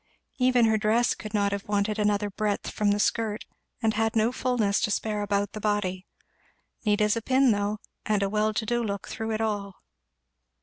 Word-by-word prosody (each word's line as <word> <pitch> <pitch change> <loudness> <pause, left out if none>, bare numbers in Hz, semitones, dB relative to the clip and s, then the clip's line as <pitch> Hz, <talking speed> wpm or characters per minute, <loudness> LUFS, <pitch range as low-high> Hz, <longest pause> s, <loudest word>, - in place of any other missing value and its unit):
Even 250 -2 +4
her 220 -1 +3
dress 225 +3 +2
could 215 - -8
not 200 -2 +1
have 200 0 -4
wanted 205 +1 0
another 205 0 +1
breadth 205 0 -2
from 210 -1 0
the 205 - +2
skirt 215 0 0 0.4
and 220 -1 +3
had 225 +2 0
no 225 +2 +3
fulness 245 -6 0
to - - +1
spare 210 0 -1
about 205 0 0
the 215 - -6
body. 200 -3 -1 0.8
Neat 210 -1 +2
as 210 +1 +3
a 230 - -2
pin 260 +2 +3
though; 205 0 0 0.3
and 210 -2 +1
a - - +1
well 215 +1 +1
to 220 +1 -2
do 240 +2 0
look 200 -3 -4
through 220 0 -4
it 220 0 -1
all. 205 -3 -2
210 Hz, 200 wpm, -27 LUFS, 205-225 Hz, 0.8 s, Even